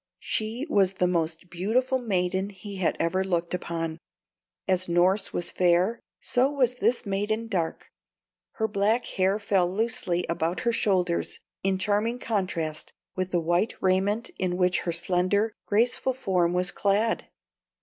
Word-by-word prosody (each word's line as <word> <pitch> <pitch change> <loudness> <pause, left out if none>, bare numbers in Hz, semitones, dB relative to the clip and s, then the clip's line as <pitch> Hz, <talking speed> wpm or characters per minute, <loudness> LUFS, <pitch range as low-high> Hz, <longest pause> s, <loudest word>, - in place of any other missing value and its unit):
She 225 +5 -2
was 195 - +3
the 180 - +1
most 170 0 -1
beautiful 245 +9 +1
maiden 190 -4 0
he 200 0 -9
had 185 - 0
ever 185 +3 +1
looked 175 -2 -1
upon. 165 -2 -3 0.7
As 185 -1 +1
Norss 180 +4 +2
was 175 - 0
fair, 180 +6 +2 0.2
so 255 +2 +2
was 265 -4 +1
this 250 -1 0
maiden 210 +3 -1
dark; 175 -7 -3 0.6
her 220 -3 0
black 210 +3 +1
hair 190 +2 +1
fell 195 -4 +1
loosely 190 -4 0
about 170 +1 -1
her 235 -1 +1
shoulders 185 -6 +1 0.2
in 195 0 +1
charming 210 +5 0
contrast 180 -9 -2 0.2
with 185 0 -2
the 175 - +1
white 175 +6 +1
raiment 195 +4 +1
in 180 -1 0
which 180 0 +2
her 170 - -2
slender, 185 +5 +1
graceful 240 +4 +2
form 180 -8 +1
was 180 +1 +1
clad. 210 +3 +1
190 Hz, 145 wpm, -26 LUFS, 175-215 Hz, 0.7 s, was